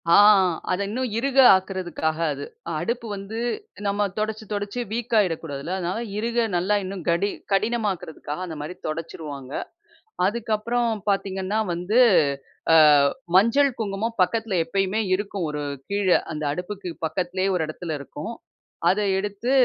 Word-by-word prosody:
ஆ, - - +6 0.6
அத 185 - 0
இன்னும் 250 +4 -2
இருக 270 +3 -1 0.2
ஆக்குறதுக்காக 180 -4 -2 0.2
அது. 140 +1 -6 0.3
அடுப்பு 235 +5 -2
வந்து 200 +3 -6 0.5
நம்ம 205 +1 +1
துடைச்சி, 215 0 -2
துடைச்சி 205 +3 -3
வீக்காயிடக்கூடாதுல்ல 180 -9 0
அதனால 180 +4 -2 0.2
இருக 235 +1 +1
நல்லா 185 +4 +2
இன்னும் 190 -1 -6
கடி 170 +4 +2 0.2
கடினமாக்குறதுக்காக 195 -8 -1
அந்த 165 -3 -6
மாரி 155 +5 -6
துடைச்சிருவாங்க. 155 -4 -6 0.8
அதுக்கப்புறம் 235 +2 0 0.2
பார்த்தீங்கன்னா 195 +1 -1
வந்து 180 +7 0 0.7
அ - - +8 0.6
மஞ்சள், 230 +8 +5
குங்குமம் 220 +2 -2
பக்கத்தில 225 +2 0
எப்பயுமே 195 +5 0
இருக்கும் 195 -2 -2
ஒரு 150 0 -3 0.3
கீழ. 200 0 -1 0.3
அந்த 155 0 -4
அடுப்புக்கு 180 +3 -5 0.2
பக்கத்திலேயே 185 +3 -1
ஒரு 180 - +1
இடத்துல 160 +1 -5
இருக்கும். 150 - -7 0.6
அத 190 +4 +3 0.2
எடுத்து 205 +4 -3
195 Hz, 120 wpm, -24 LUFS, 175-220 Hz, 0.8 s, அ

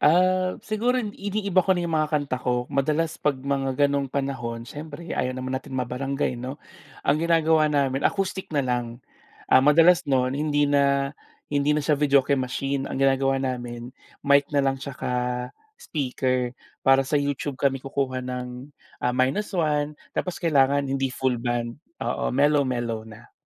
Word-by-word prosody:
ah, 185 +3 +3
siguro 235 +3 0
iniiba 200 -3 0
ko 190 - +4
na 175 - -1
'yung 165 -2 -2
mga 155 0 0
kanta 145 -3 -2
ko 125 -1 0
madalas 150 +4 0
kapag 140 -3 -1
mga 140 -1 0 0.2
ganong 140 -1 -1
panahon 125 -4 -3
siyempre 155 +5 -8
ayaw 130 0 -1
naman 130 0 -3
natin 130 - -11
ma-barangay 130 +1 -2
'no? 130 +3 -5 0.5
Ang 140 - +3
ginagawa 160 -2 +4
namin 140 -2 +1
acoustic 190 -1 -2
na 140 - +2
lang, 120 -1 -2 0.5
ah, 130 - +6
madalas 165 +5 +6
no'n 130 -1 +2
hindi 145 0 +1
na 140 0 +2 0.4
hindi 145 +1 +2
na 150 - 0
siya 155 - +3
videoke 140 -1 +3
machine, 135 +1 -2
ang - - -3
ginagawa 135 0 +2
namin 125 -2 -4 0.3
mic 140 0 +5
na 145 -2 +2
lang 135 0 0
at - - -5
saka 130 - -5 0.7
speaker 130 - -2 0.3
para 135 0 +5
sa 145 +2 +1
YouTube 140 -1 -3
kami 135 -1 +2
kukuha 135 -2 -2
ng, 125 +2 -6 0.3
ah, 125 0 +1
-1 150 +1 0 0.2
tapos 180 - -3
kailangan 140 -4 +3
hindi 135 -1 -1
full 130 -2 0
band, 120 0 -2 0.2
oo - - -1
mellow-mellow 130 -5 +1
na. 110 +1 -14
140 Hz, 155 wpm, -25 LUFS, 130-150 Hz, 0.7 s, ah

